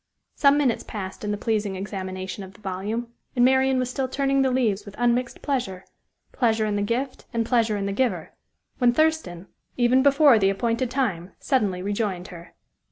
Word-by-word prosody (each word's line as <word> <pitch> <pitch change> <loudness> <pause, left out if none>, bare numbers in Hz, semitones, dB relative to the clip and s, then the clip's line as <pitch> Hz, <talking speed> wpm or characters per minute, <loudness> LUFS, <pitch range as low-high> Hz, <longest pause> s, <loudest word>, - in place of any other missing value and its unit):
Some 280 0 +4
minutes 270 -6 +1
passed 190 -2 -7
in 210 - -2
the 205 - -1
pleasing 210 -2 -1
examination 190 -1 -5
of 190 0 -11
the - - -18
volume; 210 +5 -4 0.2
and 245 -1 +4
Marian 265 0 +3
was 255 -1 -1
still 265 0 -2
turning 275 +1 +1
the 265 - +3
leaves 235 -6 +1
with 200 -2 -11
unmixed 240 +1 0
pleasure 235 -10 -2 0.5
pleasure 225 -3 +1
in 210 -1 -1
the 205 - 0
gift, 245 +6 -3
and 230 0 +1
pleasure 225 -3 +2
in 200 - -2
the 200 - -1
giver 200 -9 -1 0.5
when 245 -2 +4
Thurston, 310 - 0 0.3
even 250 +1 +4
before 280 -3 +6
the 195 -1 +3
appointed 230 +4 -1
time, 205 -10 -2
suddenly 205 -9 0
rejoined 200 -3 -2
her. 170 -2 -12
230 Hz, 180 wpm, -24 LUFS, 195-255 Hz, 0.5 s, before